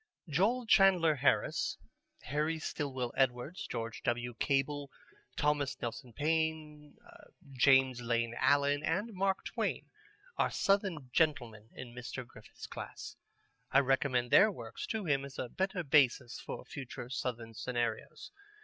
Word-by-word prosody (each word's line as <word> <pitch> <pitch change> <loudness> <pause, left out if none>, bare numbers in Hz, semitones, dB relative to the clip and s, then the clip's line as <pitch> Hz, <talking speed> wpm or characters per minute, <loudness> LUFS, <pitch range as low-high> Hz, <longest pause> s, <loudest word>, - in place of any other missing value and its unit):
Joel 205 - +1
Chandler 190 -7 +5
Harris, 180 +7 +1 0.5
Harry 155 +3 -1
Stillwell 130 -5 -3
Edwards, 130 +5 0
George 115 0 -5
W. 120 0 -1
Cable, 140 0 0 0.5
Thomas 145 -2 0
Nelson 120 +2 -5
Page, 155 +1 -2 0.6
James 130 -1 +4
Lane 115 -1 0
Allen, 145 0 +3
and 195 +9 -1
Mark 195 0 0
Twain - - -3 0.5
are - - +2
Southern 190 -10 0
men 120 -9 0
in 120 -2 -8
Mr. 125 +1 -6
Griffith's - - -12
class. - - -8 0.5
I - - +3
recommend 130 -2 +1
their 215 - +7
works 115 - -7
to 220 -3 -3
him 140 -4 +1
as 140 -1 -9
a 125 - -4
better 190 - -2
basis 135 -4 +3
for - - -7
future 130 -3 -7
Southern 115 -3 -4
scenarios. 120 +1 -3
140 Hz, 125 wpm, -33 LUFS, 125-160 Hz, 0.6 s, their